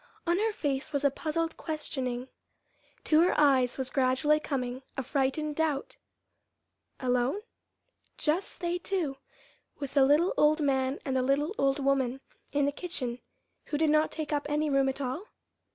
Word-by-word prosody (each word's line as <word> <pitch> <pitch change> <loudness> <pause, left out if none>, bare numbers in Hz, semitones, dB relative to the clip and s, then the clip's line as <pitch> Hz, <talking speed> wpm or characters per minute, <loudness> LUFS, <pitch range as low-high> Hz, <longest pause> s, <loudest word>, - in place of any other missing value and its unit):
On 345 +2 +2
her 440 +1 +2
face 285 -7 -2
was 285 -1 -1
a 280 - +5
puzzled 325 +3 -2
questioning. 260 -5 -3 0.8
To 310 0 +4
her 350 - +3
eyes 265 -4 +4
was 260 -1 -3
gradually 265 +3 +3
coming 255 -4 -3 0.2
a 265 - -1
frightened 285 +3 0
doubt. 310 -4 -1 1.0
Alone? 250 +8 +1 0.8
just 335 +6 -1
they 350 0 -1
two, 335 -8 -2 0.6
with 280 -2 -6
the 280 -2 +5
little 295 +7 +4
old 300 +1 +4
man 270 -1 +1
and 265 - -1
the 260 - +3
little 280 +7 +1
old 275 0 +3
woman 270 -2 +1 0.3
in 285 -1 +2
the 285 - +1
kitchen 275 -7 -4 0.5
who 295 - -2
did 315 0 +3
not 305 +1 +4
take 310 -2 -4
up 290 -1 -1
any 300 0 +1
room 275 -1 +3
at 270 +1 -4
all? 270 +9 -3
285 Hz, 160 wpm, -29 LUFS, 265-310 Hz, 1.0 s, a